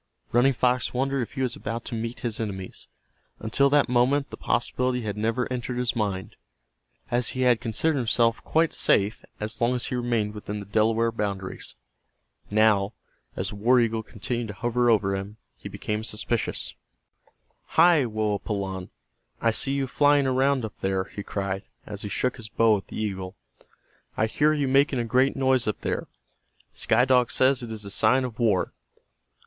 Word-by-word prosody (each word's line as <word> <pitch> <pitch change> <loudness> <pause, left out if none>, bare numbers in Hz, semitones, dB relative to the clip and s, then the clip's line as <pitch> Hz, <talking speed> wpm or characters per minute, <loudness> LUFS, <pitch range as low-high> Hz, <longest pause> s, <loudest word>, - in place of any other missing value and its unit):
Running 125 +3 +4
Fox 125 0 +1
wondered 135 +1 0
if 120 - -5
he 135 -1 -2
was 125 -2 -1
about 115 +1 -5
to - - -5
meet 115 +1 -4
his 115 -3 -3
enemies. 95 -4 -5 0.5
Until 125 +5 +2
that 145 0 +4
moment 130 +3 +2
the - - -5
possibility 125 -1 0
had 105 -2 -3
never 115 +3 0
entered 125 0 -3
his 125 -1 0
mind, 100 -4 -3 0.7
as 120 -1 +1
he - - 0
had 125 -2 +4
considered 135 +6 0
himself 115 -1 +1
quite 160 0 +2
safe 100 +2 +2 0.2
as 110 +2 -5
long 120 +2 +2
as 125 - -1
he - - -3
remained 120 -4 0
within 105 0 -5
the 100 - -7
Delaware 110 +3 +2
boundaries. 100 -4 -4 0.7
Now, 105 -1 +3 0.4
as - - -2
the 105 - -7
war 125 +5 +4
eagle 115 -1 +1
continued 115 +2 -4
to 105 - -6
hover 120 +3 +1
over 100 -3 +3
him, 100 +2 -6 0.2
he - - -9
became 105 0 -3
suspicious. 115 +1 -2 1.0
"Hi, 165 -3 +6
Woapalanne, 100 -3 -2 0.5
I 115 - +2
see 135 +4 0
you 140 -1 0
flying 145 +1 +3
around 130 -1 +2
up 110 - -7
there," 95 0 0
he 100 - -8
cried, 100 -1 -3 0.2
as 105 -1 -7
he 105 - -4
shook 125 +6 -1
his 110 -3 -8
bow 115 0 +4
at 95 - -10
the - - -7
eagle. 95 -3 -4 0.8
"I 110 - +3
hear 145 +7 +2
you 145 -3 0
making 135 +1 +3
a 120 - 0
great 130 +4 +2
noise 130 -3 +2
up 105 - -2
there. - - -2 0.7
Sky 120 +3 +2
Dog 125 -2 +3
says 130 0 +3
it 120 -2 -6
is 110 -2 -3
a 100 - -6
sign 130 +6 +3
of 125 -2 -6
war. 105 -6 +1
115 Hz, 175 wpm, -26 LUFS, 105-125 Hz, 1.0 s, Hi